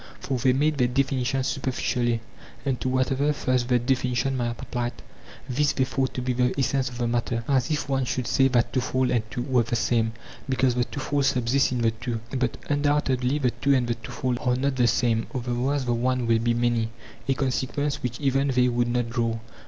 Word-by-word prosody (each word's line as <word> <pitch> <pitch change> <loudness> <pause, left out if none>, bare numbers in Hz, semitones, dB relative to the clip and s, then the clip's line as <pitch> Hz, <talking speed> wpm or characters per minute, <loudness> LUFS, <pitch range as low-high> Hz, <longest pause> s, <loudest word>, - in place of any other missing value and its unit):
For 135 - -2
they 130 +2 +4
made 150 +2 +1
their 125 - +4
definitions 130 0 0
superficially, 125 -4 -1 0.4
and 135 -3 -1
to 130 - 0
whatever 130 +3 +1
first 130 -3 0
the 125 -1 +3
defini 125 0 0
tion 135 +3 0
might 120 -2 -2
apply, 120 -1 -3 0.5
this 145 +3 +1
they 130 - +1
thought 130 0 -1
to 125 - -2
be 125 0 0
the 125 0 +1
essence 135 -1 +1
of 125 - -9
the 120 - -1
matter; 115 0 -1
as 135 0 +2
if 150 -2 -1
one 135 -2 0
should 125 0 -2
say 135 +3 +3
that 120 -2 +1
twofold 130 0 +1
and 120 -2 +2
two 120 - -3
were 130 -2 +2
the 120 +1 -2
same, 110 0 +1 0.4
because 130 -1 +2
the 120 0 +1
twofold 140 +1 -1
subsists 125 +1 +2
in 125 -2 -1
the 115 - +3
two. 115 +1 -4 0.2
But 125 -2 0
undoubtedly 145 -2 +1
the 130 -5 +1
two 140 +2 +2
and 125 -2 +1
the 120 - +1
twofold 120 +2 -3
are 125 -1 +2
not 135 +1 0
the 125 -2 +3
same; 115 -1 +1
otherwise 125 +3 -1
the 120 - +1
one 125 +1 0
will 115 -1 +3
be 120 +1 +1
many—a 120 +2 -2
consequence 135 +2 -1
which 120 -2 -3
even 135 -1 +1
they 125 -2 +3
would 120 0 +1
not 120 -1 -1
draw. 115 -2 0
125 Hz, 205 wpm, -25 LUFS, 120-135 Hz, 0.5 s, they